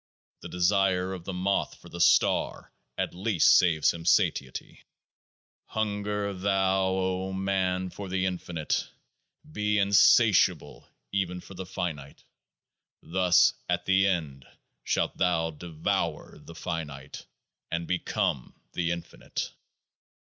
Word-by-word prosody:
The - - -8
desire 95 0 +1
of 90 -2 -8
the - - -4
moth 95 +2 -1
for - - -14
the 85 - -6
star 85 - +2 0.2
at - - -2
least 95 -1 +4
saves 80 -4 +4
him 85 -1 -8
satiety. 70 -5 0 0.8
Hunger 105 -1 -2
thou, 95 0 +1
O 95 0 -1
man, 95 -1 -1
for 100 -2 -7
the 95 0 0
infinite: 90 -4 -2 0.6
be 105 -6 0
in 100 0 +1
satiable 90 - +4 0.2
even 90 -2 -1
for 95 - -12
the 95 0 -7
finite; 75 -7 -5 0.8
thus 90 +1 +4 0.2
at 90 0 0
The 95 +1 +3
End 75 -8 -2 0.4
shalt - - -1
thou 80 -2 +1
devour 80 0 -3
the - - -13
finite, 75 -6 -6 0.4
and 85 0 -2
become 85 -7 -2 0.2
the 85 -1 -1
infinite. 85 -1 -5
90 Hz, 120 wpm, -27 LUFS, 85-95 Hz, 0.8 s, least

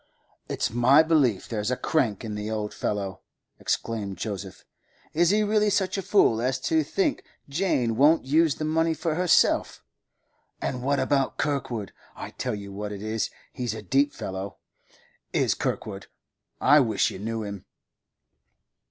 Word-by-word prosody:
'It's - - -1
my 125 +6 +5
belief 145 - +2
there's 105 -1 -2
a 125 - 0
crank 120 -9 0
in 110 - -4
the 105 +1 -4
old 105 -1 -3
fellow,' 100 -2 -3 0.4
exclaimed 105 -5 -2
Joseph. 100 -1 -6 0.5
'Is 170 +2 +3
he 210 +2 +3
really 210 0 +2
such 190 -2 +1
a 195 - -1
fool 120 - +3
as 130 +1 0
to 160 +2 +2
think 190 +6 -1 0.2
Jane 140 -7 0
won't 145 +4 +4
use 155 +2 +3
the 155 - -3
money 160 +1 +1
for 160 +1 -1
herself? 180 +1 +2 0.8
And 125 - -3
what 140 +2 +1
about 135 -2 +1
Kirkwood? 125 -8 -2 0.2
I - - -7
tell 125 -4 -3
you 100 -1 -8
what 105 +1 -5
it 100 0 -6
is; 110 0 -1 0.2
he's 120 -3 -3
a - - -7
deep 140 +2 +2
fellow, 95 -3 -6 0.8
is - - +2
Kirkwood. 100 -2 -4 0.5
I 150 - +6
wish 110 -7 +2
you - - -8
knew 110 +2 -3
him. 100 -2 -7
125 Hz, 155 wpm, -26 LUFS, 105-155 Hz, 0.8 s, I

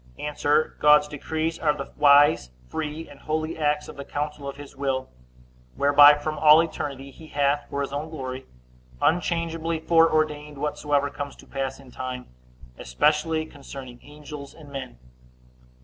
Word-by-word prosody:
A. 150 0 -4 0.5
God's 150 0 +6
decrees 160 +2 -3
are 150 -2 +1
the 140 - -7
wise, 145 - +5 0.2
free, 155 - -5
and 145 -1 -14
holy 155 +1 -2
acts 150 -1 0
of - - -10
the 140 - -6
counsel 145 0 -4
of 140 - -9
his 145 -1 -11
will, 135 -1 -2 0.7
whereby, 145 +1 +7
from 155 +1 -4
all 155 0 +8
eternity, 140 -4 -5
he 160 +3 -14
hath, 145 0 0
for 140 - -3
his 140 0 -4
own 150 +3 -3
glory, 130 -4 -6 0.5
unchangeably 165 0 0
foreordained 155 -3 +2
whatsoever 145 -1 0
comes 140 0 -6
to - - -16
pass 135 0 -4
in 135 -2 -15
time, 125 0 -6 0.5
especially 155 - +1
concerning 135 -4 -10
angels 145 -1 -10
and 150 -3 -14
men. 135 - -7
145 Hz, 150 wpm, -25 LUFS, 140-155 Hz, 0.7 s, all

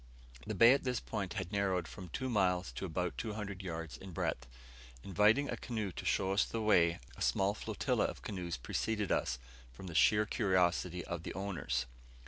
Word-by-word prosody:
The - - -2
bay 115 +2 +8
at 140 - 0
this 125 -2 0
point 100 -5 -4
had 85 - -4
narrowed 95 -4 +1
from 90 -3 -9
two 130 - -3
miles 95 -6 +1
to - - -5
about 90 0 -2
200 105 -3 -4
yards 80 -4 -5
in 95 -2 -10
breadth. 60 -5 -2 0.6
Inviting 105 +8 +4
a - - -2
canoe 110 -5 -3
to - - -7
show 95 0 +1
us 100 - +4
the 115 - -3
way, 85 -6 +4 0.2
a - - -11
small 100 +1 +2
flotilla - - 0
of - - -5
canoes 90 -5 -4
preceded 105 - -1
us, 65 - +1 0.3
from 65 +10 -11
the 85 - -6
sheer 105 +5 +5
curiosity 90 -4 +1
of 85 -2 -4
their 85 - -6
owners. 95 -9 -1
95 Hz, 185 wpm, -34 LUFS, 90-105 Hz, 0.6 s, bay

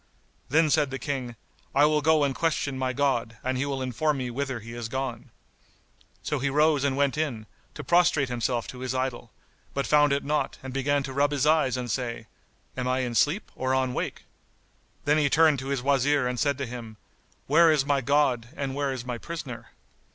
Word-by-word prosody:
Then 155 +2 +3
said 150 -3 +3
the 135 - -4
King, 130 -5 -4 0.4
"I 145 +2 +6
will 150 0 +2
go 155 0 +4
and 140 -1 +1
question 155 -3 -1
my 130 -1 -1
God, 120 -4 0
and 130 0 -1
he 135 +2 -1
will 135 -2 -2
inform 140 +4 0
me 125 -2 -3
whither 135 -1 -3
he 115 +1 -10
is 120 -1 -5
gone." 130 -2 -4 0.9
So 150 - -1
he 135 +2 0
rose 150 0 +3
and 135 -1 0
went 140 +1 +1
in, 125 -9 -2 0.3
to 150 - -6
prostrate 170 -2 +3
himself 120 -1 -1
to 125 - -8
his 130 0 -3
idol, 130 -1 -3 0.4
but 140 - 0
found 145 -1 +4
it 140 0 +1
not 150 +1 -1
and 130 -1 -6
began 140 +1 +1
to 135 -1 -6
rub 140 +2 +2
his 145 -1 0
eyes 150 -5 +3
and 125 -2 -3
say, 115 -3 -3 0.5
"Am 125 -1 -2
I 130 +1 +1
in 125 -2 -2
sleep 150 - +1
or 130 0 0
on 130 -1 0
wake?" - - -4 0.8
Then 150 +1 +3
he 145 -2 +2
turned 155 -1 +4
to 130 - -6
his 135 -3 -2
Wazir 140 0 +2
and 125 -1 -2
said 140 -2 +1
to 140 - -3
him, 115 -3 -8 0.5
"Where 165 +3 +5
is 145 -3 +2
my 140 -1 +1
God 135 -3 +2
and 135 -1 -3
where 140 0 -1
is 130 -2 -5
my 120 -2 -4
prisoner? 145 -8 -7
135 Hz, 210 wpm, -26 LUFS, 125-145 Hz, 0.9 s, I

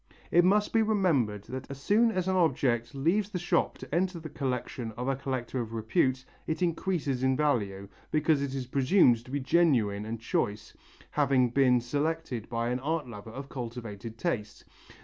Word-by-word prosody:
It 175 - +6
must 205 +3 +3
be 225 - +4
remembered 165 - +1
that 130 +3 -7
as 140 -1 -7
soon 220 +10 +3
as 185 -3 -1
an 190 - +1
object 130 -8 +1
leaves 180 +9 +1
the 190 - -3
shop 175 - 0
to - - -10
enter 180 +1 0
the 160 -1 -8
collection 125 -5 -3
of 125 +4 -5
a 135 - +1
collector 130 -2 -3
of 115 -1 -6
repute, 125 +4 0 0.2
it 160 +3 -1
increases 165 -6 -1
in 130 0 +2
value, 100 -10 0 0.2
because 155 -1 +2
it 140 -1 -3
is 130 -2 -3
presumed 130 - +4
to 125 - -15
be 140 +2 -1
genuine 125 -9 +2
and 115 0 -4
choice, 105 -2 -2 0.4
having 135 -4 +2
been 125 -1 +4
selected 145 -1 -2
by 115 0 -1
an 125 +1 -1
art 155 +2 -2
lover 110 -2 -9
of 135 +4 -7
cultivated 115 -4 -7
taste. 115 -11 -3
130 Hz, 180 wpm, -29 LUFS, 120-160 Hz, 0.4 s, It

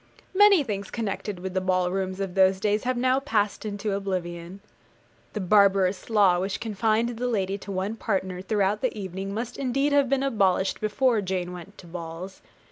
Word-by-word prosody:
Many 400 -4 +6
things 200 -5 -4
connected 210 -3 -4
with 185 0 -5
the 185 - 0
ball 185 -1 +1
rooms 190 0 -2
of 195 -2 -3
those 190 0 +4
days 210 +3 0
have 255 0 0
now 255 +2 +2
passed 215 -7 -1
into 205 0 -3
oblivion. 180 -2 -4 0.7
The 215 - -3
barbarous 195 0 +3
law 200 -5 +4
which 190 +2 -2
confined 225 +1 0
the 240 +1 -3
lady 200 -4 -1
to 200 - -8
one 195 +3 -2
partner 190 -4 -2
throughout 205 +1 0
the 255 -4 -1
evening 190 0 -5
must 230 +4 -4
indeed 275 +2 0
have 280 -3 +3
been 275 0 +1
abolished 195 -7 +1
before 220 +2 +2
Jane 185 -2 -3
went 180 +3 -11
to - - -13
balls. 170 +2 -8
200 Hz, 180 wpm, -26 LUFS, 185-225 Hz, 0.7 s, Many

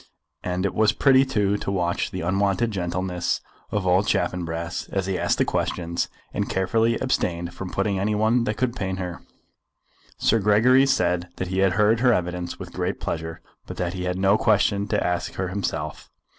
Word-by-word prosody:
And 90 +1 -1
it 100 - -1
was 110 0 +3
pretty 135 -1 +5
too 105 -6 +1
to 100 - -3
watch 85 -3 0
the - - -5
unwonted 100 +6 +1
gentleness 90 -1 -2 0.3
of 105 -3 -2
old 95 +3 +3
Chaffanbrass 85 -1 -2
as 95 -1 -1
he 95 -1 -2
asked - - +1
the - - +2
questions, 85 -1 -1 0.2
and - - -2
carefully 110 +5 +1
abstained 85 -8 -1
from 90 +1 -6
putting 95 0 -1
any 105 +2 0
one 115 +3 +2
that 105 -2 -2
could 125 +1 0
pain 95 -4 -2
her. 90 -2 -5 1.0
Sir 115 - +3
Gregory 115 +6 +5
said 90 -6 +1
that 90 - -4
he 95 +1 -1
had 95 -1 +3
heard 105 +2 +3
her 125 0 +4
evidence 90 -2 -2
with - - -9
great - - -2
pleasure, 80 0 -4 0.3
but - - -7
that 90 0 -2
he 90 -1 -4
had 90 0 -1
no 95 +2 +3
question 100 -2 +2
to - - 0
ask 90 -1 -2
her 95 -1 -2
himself. 100 +1 -4
95 Hz, 185 wpm, -24 LUFS, 90-105 Hz, 1.0 s, pretty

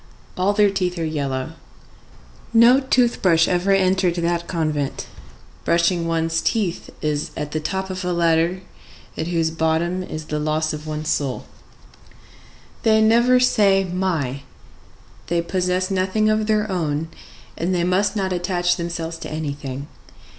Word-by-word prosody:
All 185 +2 +2
their 205 -1 +4
teeth 180 -2 -1
are 165 - -1
yellow. 140 -2 -2 1.0
No 235 +3 +7
tooth 255 -3 +1
brush 165 -3 +4
ever 180 +2 +1
entered 185 -2 +2
that 170 0 -1
convent. 155 -5 -2 0.6
Brushing 170 0 +2
one's 165 0 0
teeth 200 -7 -1
is 150 -1 -1
at 150 0 -4
the 155 - -1
top 190 +4 -3
of 185 0 -5
a 180 - -1
ladder 170 +1 +2 0.5
at 160 - -3
whose 165 -2 0
bottom 160 +3 0
is 155 -4 -6
the 150 -1 -3
loss 155 +1 0
of 155 +1 -7
one's 155 0 -4
soul. 135 -3 -1 1.4
They 220 -1 +4
never 235 +3 +4
say 200 -6 +3
my. 175 -8 -2 0.9
They 170 - +1
possess 180 +2 -1
nothing 195 +3 +1
of 215 0 0
their 215 -1 +1
own, 160 -3 -1 0.5
and 170 +3 -2
they 175 - +1
must 185 +4 +1
not 190 -3 -1
attach 175 0 0
themselves 170 -1 -4
to - - -7
anything. 140 -3 -5
175 Hz, 145 wpm, -21 LUFS, 160-190 Hz, 1.4 s, No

